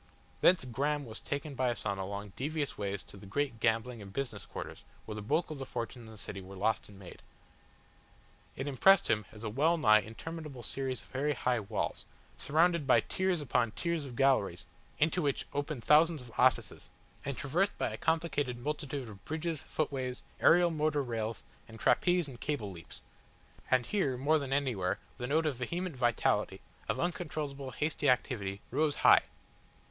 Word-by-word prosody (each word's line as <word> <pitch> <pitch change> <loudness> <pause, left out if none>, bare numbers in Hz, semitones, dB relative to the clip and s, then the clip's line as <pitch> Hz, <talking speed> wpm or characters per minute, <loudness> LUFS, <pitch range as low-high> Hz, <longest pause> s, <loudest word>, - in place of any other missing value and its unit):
Thence 180 -7 +5
Graham 145 +4 -1
was 110 -2 -8
taken 140 +1 -4
by 130 -1 +1
Asano 100 -4 -2
along 100 0 -6
devious 150 +1 -2
ways 100 -1 -3
to - - -14
the 100 - -12
great 135 +1 -1
gambling 115 +1 +1
and 100 -1 -9
business 135 +5 -4
quarters - - -7 0.2
where 110 - -5
the 105 - -5
bulk 155 +11 0
of 150 - -6
the - - -3
fortunes 120 -1 -5
in - - -11
the 110 - -12
city 100 -1 -7
were 95 +1 -10
lost 105 +3 0
and 100 - -13
made. 95 -2 -11 1.3
It 135 - -4
impressed 175 +8 +5
him 105 -2 +1
as 110 +1 -11
a 110 - -2
well 155 +8 +3
nigh 110 -8 +6
interminable 140 +4 -7
series 130 -1 -3
of - - -18
very 145 +3 0
high 125 -1 +1
halls, 105 0 -3 0.3
surrounded 165 0 +2
by 120 -4 +6
tiers 185 - 0
upon 120 -5 +1
tiers 170 -4 -2
of 125 - -9
galleries 130 -10 +2 0.3
into 165 +4 +2
which 140 -2 0
opened 145 -3 -3
thousands 155 -1 +5
of 120 - -12
offices, 130 +1 +2 0.3
and 140 -1 -3
traversed 175 +8 +1
by - - 0
a - - -4
complicated 160 -6 0
multitude 140 0 -3
of 100 -3 -11
bridges, 160 -1 -3
footways, 130 -4 -3 0.2
aerial 175 0 +6
motor 155 -2 +1
rails, 115 -2 -3 0.2
and 115 -1 -12
trapeze 175 +6 +3
and 125 -4 -10
cable 115 -10 -2
leaps. 85 -2 -10 0.7
And 130 -2 +3
here 140 - 0
more 150 +5 +3
than 140 -2 -5
anywhere 125 -10 0 0.2
the 125 - -3
note 160 +4 +2
of 145 -5 0
vehement 170 +6 -3
vitality, 120 -3 +1 0.3
of - - 0
uncontrollable, 150 -6 -3
hasty 145 +2 0
activity, 105 -6 0
rose 145 +3 +2
high. - - +9
135 Hz, 175 wpm, -32 LUFS, 115-155 Hz, 1.3 s, high